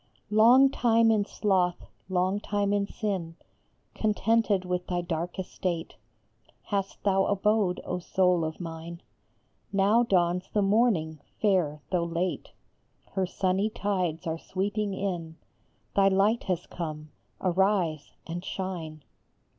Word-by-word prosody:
ONG 250 +5 +7
time 230 -2 +3
in 215 -2 +3
sloth, 185 -5 0 0.2
long 185 +2 +1
time 205 -1 -1
in 200 -1 +1
sin, 185 -7 -3 0.6
Contented 215 -2 +1
with 180 0 -2
thy 180 -1 -1
dark 170 0 -4
estate 180 -2 -3 0.7
Hast 195 -2 -3
thou 195 -1 +3
abode, 205 -2 +1
O 180 - -2
soul 180 -1 +2
of 160 0 -4
mine; 170 0 -7 0.7
Now 200 +4 +4
dawns 180 -4 +1
the 210 - +2
morning, 195 -7 +2 0.2
fair 170 -8 +1
though 175 -2 +1
late, 170 +2 -2 0.6
Her 190 -1 -1
sunny 190 +3 0
tides 185 -6 -2
are 160 0 -2
sweeping 200 +2 -2
in. 170 -5 -4 0.6
Thy 195 -1 +5
light 200 +4 +2
has 180 -2 -1
come; 155 -3 -6 0.3
arise 185 -4 +1
and 175 +2 -5
shine 165 -7 -5
185 Hz, 125 wpm, -28 LUFS, 170-205 Hz, 0.7 s, ONG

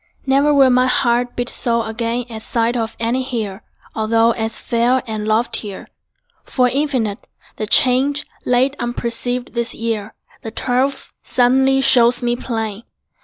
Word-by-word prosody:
Never 275 +2 +3
will 275 -3 +5
My 250 +1 +3
heart 245 -1 +1
beat 245 0 -2
so 235 -2 0
again 230 +2 -3
at 225 -2 -8
sight 230 +1 -1
Of 225 -1 -3
any 235 +3 0
hill 225 -7 -4 0.3
although 225 +1 +2
as 225 -1 -3
fair 240 +2 0
And 215 -2 -4
loftier. 215 -2 -1 0.5
For 250 -3 +1
infinite 255 -7 -2 0.3
The 215 - -3
change, 265 +6 +3 0.2
late 255 +3 +2
unperceived, 240 +1 -3
this 235 -1 -2
year, 220 -2 -3 0.3
The 225 - -6
twelfth, 255 +4 -2
suddenly, 265 +2 +2
shows 245 -2 +5
me 240 0 +1
plain. 225 -4 -4
240 Hz, 140 wpm, -18 LUFS, 225-255 Hz, 0.5 s, will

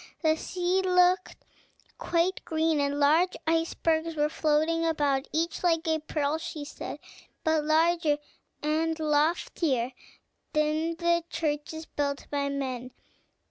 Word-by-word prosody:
The 315 0 +4
sea 360 +3 0
looked 360 0 +3 0.6
quite 345 +2 0
green, 320 -1 +1
and 285 0 0
large 315 +6 +3
icebergs 325 0 0
were 300 0 +1
floating 315 +2 +1
about, 290 -4 +1
each 330 +2 -1
like 330 -2 +1
a 320 0 +2
pearl, 305 0 -1
she 305 -2 -6
said, - - -7 0.5
but 315 -2 +2
larger 320 -1 +3 0.5
and 320 +2 0
loftier 300 -4 +1 0.6
than 310 +2 +1
the 340 0 +1
churches 310 +1 -3
built 285 -2 -3
by 280 -1 0
men. 255 -3 -4
315 Hz, 120 wpm, -28 LUFS, 295-330 Hz, 0.6 s, The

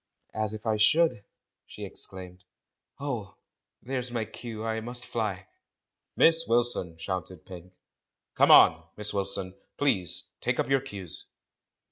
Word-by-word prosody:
"As 110 -1 -2
if 110 - -10
I 110 -1 +1
should!" 155 0 +3 0.4
she - - -8
exclaimed. 90 -1 -5 0.6
"Oh! 120 -10 -4 0.5
there's 125 -1 -3
my 115 -2 -2
cue, 115 -1 -7
I 110 0 -1
must 120 +2 -7
fly!" 100 -5 -3 0.7
"Miss 165 0 +4
Wilson!" 115 -8 +1
shouted 90 0 -5
Pink. 90 -1 -11 0.6
"Come - - +4
on. 80 0 +8
Miss 105 0 -2
Wilson, 95 -2 -1 0.2
please 110 - +2
— - - -54
take - - 0
up - - 0
your 135 -1 +4
cues!" 100 -10 -8
110 Hz, 135 wpm, -28 LUFS, 95-120 Hz, 0.7 s, on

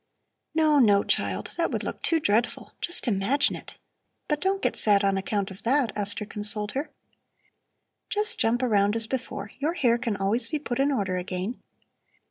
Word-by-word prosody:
"No, 310 -2 +4
no, 205 -5 +5
child; - - -1
that 335 - +1
would - - -3
look - - -5
too 330 - +2
dreadful. 230 -3 0
Just 345 -6 -1
imagine 230 +7 +2
it! - - -11 0.5
But 300 -1 -1
don't 390 +1 0
get - - +1
sad 205 -1 +3
on 195 0 +2
account 195 +1 -2
of 190 - -11
that," 255 -2 +2
Esther 205 +1 -1
consoled 210 0 +1
her. 280 +4 -3 1.2
"Just 420 0 +1
jump 240 +3 +2
around 205 -3 +2
as 225 -1 0
before! 225 -4 -5
Your 305 +4 0
hair 245 -8 +2
can 235 -4 -2
always 220 +5 0
be 305 - -1
put 265 -4 -4
in 280 +1 +3
order 200 -8 -1
again. 185 +5 -4
230 Hz, 175 wpm, -26 LUFS, 200-280 Hz, 1.2 s, no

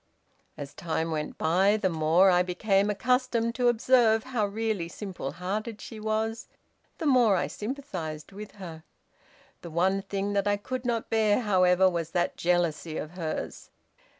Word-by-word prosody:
"As 140 -1 -7
time 165 -1 -2
went 155 -1 -3
by, 190 +6 +3
the 200 - +1
more 165 +3 +4
I 180 0 +4
became 195 +3 +1
accustomed 235 +2 +1
to 250 0 +1
observe 235 -2 +4
how 240 -5 -1
really 215 -4 -2
simple 180 -7 -6
hearted 205 +6 -4
she 225 - -9
was, 220 +1 -2 0.5
the 325 - -4
more 245 -7 +5
I 175 - +1
sympathized 180 - -6
with 205 +1 -9
her. 170 -5 -9 0.8
The 170 - -8
one 185 +4 +1
thing 195 0 -3
that 200 0 +1
I 205 0 +2
could 255 +4 -5
not 235 -2 -2
bear, 220 0 +3
however, 185 -3 +4
was 170 -3 -1
that 175 - 0
jealousy 170 -2 0
of 155 - -5
hers. 170 -3 -5
195 Hz, 155 wpm, -28 LUFS, 175-225 Hz, 0.8 s, more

